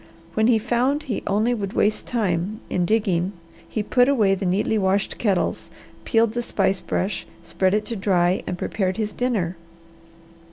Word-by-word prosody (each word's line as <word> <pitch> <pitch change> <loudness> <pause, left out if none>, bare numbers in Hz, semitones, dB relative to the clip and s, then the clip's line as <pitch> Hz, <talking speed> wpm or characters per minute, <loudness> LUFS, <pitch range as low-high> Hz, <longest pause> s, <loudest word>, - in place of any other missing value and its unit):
When 220 +1 +2
he 240 -2 +5
found 245 +6 0
he 255 -8 -3
only 215 +4 +2
would 200 -4 -3
waste 210 +1 +1
time 205 -3 -1
in 180 - +1
digging 195 -4 +1 0.4
he 215 - -2
put 245 +4 +3
away 215 -8 +3
the 195 0 -1
neatly 205 +4 +1
washed 195 +1 0
kettles, 200 -5 0 0.4
peeled 225 -2 +2
the 240 - -1
spice 195 -5 0
brush, 185 +1 -2 0.2
spread 185 +3 +1
it 210 - 0
to 230 - -4
dry, 185 -2 +2
and 180 - -3
prepared 185 0 -1
his 215 -1 -1
dinner. 205 -8 -1
205 Hz, 165 wpm, -23 LUFS, 190-230 Hz, 0.4 s, he